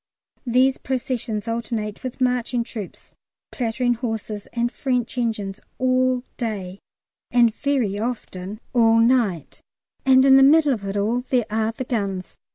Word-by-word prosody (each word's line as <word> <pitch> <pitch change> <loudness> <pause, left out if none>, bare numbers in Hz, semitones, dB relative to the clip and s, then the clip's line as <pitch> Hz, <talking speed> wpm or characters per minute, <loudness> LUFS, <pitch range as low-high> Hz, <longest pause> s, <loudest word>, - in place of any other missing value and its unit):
These 255 +2 +3
processions 240 -4 -3
alternate 225 -2 -3
with 255 0 -6
marching 250 -1 +1
troops, 215 -5 -9 0.4
clattering 245 0 0
horses, 225 -3 -4
and 240 0 -1
French 250 -4 -2
engines 215 -5 -2 0.2
all 255 -1 +2
day, 200 -5 -4 0.5
and 235 -2 +4
very 250 -9 0
often 215 -4 -5
all 230 -2 +5
night, 230 - +1 0.4
and 260 0 +5
in 270 0 +7
the - - +7
middle 290 +1 +6
of 205 -5 -5
it 195 +1 -3
all 225 +5 +1
there 245 -4 +2
are 220 +1 0
the 260 - -4
guns. 200 -7 -3
235 Hz, 140 wpm, -23 LUFS, 215-255 Hz, 0.5 s, in